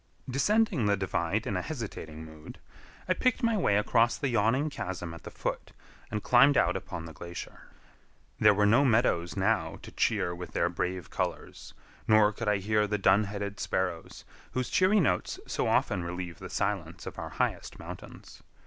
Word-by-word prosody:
Descending 155 - +2
the 100 0 +3
divide 95 +2 -1
in 100 - -2
a 90 - 0
hesitating 90 - -6
mood, 80 -1 -11 0.5
I 185 - +3
picked 255 +5 0
my 230 -1 +3
way 105 - +2
across 115 +3 +3
the 140 - -1
yawning 120 +6 +2
chasm 90 -7 -5
at 85 - -10
the - - -8
foot, - - -4 0.4
and 105 0 -3
climbed 135 +3 +6
out 90 +2 +3
upon 85 -3 -5
the 80 - -9
glacier. 85 +1 -9 0.7
There 105 -1 +6
were 105 +1 +3
no 120 +7 +5
meadows 110 - +2
now - - +1
to - - -10
cheer 85 - 0
with 90 0 -8
their 85 - +1
brave 90 0 -3
colors, - - -4 0.3
nor 110 -1 +5
could 115 - -5
I 105 -1 +3
hear 105 +2 +1
the 105 +1 0
dun 100 +1 +4
headed 100 0 -5
sparrows, - - -3 0.3
whose 130 -1 -1
cheery 190 +3 +4
notes 90 - 0
so - - -1
often 90 - +1
relieve 85 -1 -5
the - - -8
silence - - -2
of - - -7
our - - -5
highest - - -2
mountains. - - -10
105 Hz, 175 wpm, -29 LUFS, 90-125 Hz, 0.7 s, climbed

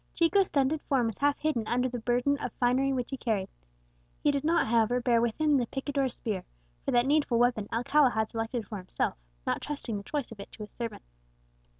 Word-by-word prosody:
Chico's 365 +3 +4
stunted 285 +2 +1
form 260 -4 +1
was 225 -3 -3
half 285 0 +2
hidden 270 -8 -1
under 250 +1 +1
the 245 -1 -4
burden 245 +4 +1
of - - -3
finery 260 +2 +2
which 250 -2 -2
he 270 - -3
carried; 215 -6 -1 0.7
he 295 - +4
did 280 -1 -1
not, 335 +2 +3
however, 230 +2 +2
bear 240 -2 +3
with 235 +1 -1
him 300 -2 +4
the 245 -3 0
picador's 270 -1 -2
spear, 205 -5 -3 0.4
for - - -3
that 240 0 +3
needful 285 -4 +2
weapon 235 -4 +2
Alcala 255 +4 +4
had 220 -2 0
selected 225 +1 -3
for 215 - -5
himself, 185 - -2 0.3
not - - 0
trusting 275 -7 -4
the 200 - -7
choice 285 +1 -3
of 220 - -10
it 200 - -9
to 215 - -8
a - - -7
servant. 230 +1 -6
245 Hz, 215 wpm, -29 LUFS, 225-280 Hz, 0.7 s, Chico's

